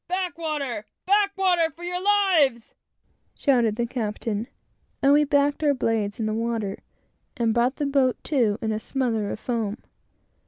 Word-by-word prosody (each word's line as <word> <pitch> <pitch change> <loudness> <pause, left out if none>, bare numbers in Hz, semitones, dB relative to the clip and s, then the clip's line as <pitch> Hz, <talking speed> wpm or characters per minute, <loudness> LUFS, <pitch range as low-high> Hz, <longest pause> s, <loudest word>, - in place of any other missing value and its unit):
"Back 365 -1 -2
water! 290 -9 -3 0.2
back 400 0 +2
water, 355 -4 +3
for 340 +2 -14
your 360 +1 -3
lives!" 370 - +2 0.6
shouted 240 -7 +2
the 240 +1 -1
captain; 225 -2 -3 0.5
and 275 +1 +4
we 295 +1 +5
backed 285 +1 +1
our 290 -2 +3
blades 220 -4 -1
in 220 - -1
the 215 - -1
water 225 -3 -2 0.6
and 230 -2 +1
brought 240 +3 +2
the 295 - -2
boat 275 -3 +2
to 235 -8 +1
in 220 - 0
a 215 - -1
smother 225 -4 -1
of - - -5
foam. 225 -4 -2
255 Hz, 160 wpm, -24 LUFS, 225-320 Hz, 0.6 s, we